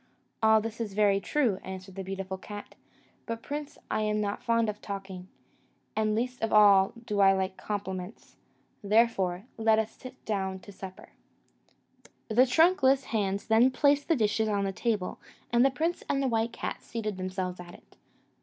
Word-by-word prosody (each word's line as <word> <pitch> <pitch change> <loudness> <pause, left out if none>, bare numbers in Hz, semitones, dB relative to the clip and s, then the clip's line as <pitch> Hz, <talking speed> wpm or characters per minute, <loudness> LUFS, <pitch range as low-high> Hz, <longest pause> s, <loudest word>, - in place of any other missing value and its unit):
"All 220 0 +5
this 225 +1 -5
is 205 -4 -4
very 205 -2 +4
true," 225 -3 0
answered 190 0 -8
the 195 +1 -6
beautiful 190 0 -5
cat; 205 +2 -9 0.5
"but, 230 0 -4
prince, 295 0 -5
I - - +1
am 215 0 0
not 205 +1 -2
fond 230 -2 +2
of 210 0 -4
talking, 195 -2 -7 0.7
and 215 -1 +1
least 250 +2 -2
of 225 - -1
all 200 -2 +6
do 210 -2 -2
I 195 -1 +6
like 190 0 -1
compliments; 190 -1 -6 0.5
let 200 - -9
us - - -8 0.7
therefore 220 0 +3
sit 255 +3 -13
down 190 -3 -2
to 210 - -12
supper." 190 -1 -10 1.2
The 245 +4 +5
trunkless 275 -2 +4
hands 200 -2 0
then 230 +3 +5
placed 285 +2 +2
the 330 - +3
dishes 220 -2 +1
on 200 -1 0
the 195 - -1
table, 205 -2 -2 0.3
and 240 +1 +4
the 270 - +5
prince 325 +6 -2
and 275 -2 +1
white 225 +1 +1
cat - - -5
seated 215 -4 -4
themselves 185 -1 -4
at 175 0 -10
it. - - -20
215 Hz, 170 wpm, -29 LUFS, 195-235 Hz, 1.2 s, all